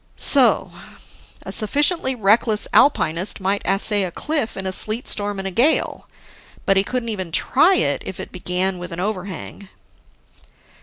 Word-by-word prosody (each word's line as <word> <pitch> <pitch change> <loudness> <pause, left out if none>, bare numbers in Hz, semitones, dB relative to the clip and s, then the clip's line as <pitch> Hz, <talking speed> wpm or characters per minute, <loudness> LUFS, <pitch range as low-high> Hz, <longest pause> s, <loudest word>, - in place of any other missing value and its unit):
So... 270 -3 +4 0.7
a - - -7
sufficiently 280 - +2
reckless 215 0 +1
alpinist 185 - +1
might 195 +1 -2
assay 200 +2 +2
a 185 - -3
cliff 290 - -4
in 190 - -5
a 190 - -2
sleet 215 +5 +1
storm 205 -1 +1
and 195 -1 -6
gale, 275 +7 0 0.6
but 195 - +2
he 195 - +2
couldn't 245 +2 -4
even 190 -6 -5
try 315 - +2
if - - -2
it - - -8
began 180 +1 -3
with 175 +1 -9
an 170 - -7
overhang. 195 0 -6
205 Hz, 145 wpm, -19 LUFS, 190-240 Hz, 0.7 s, So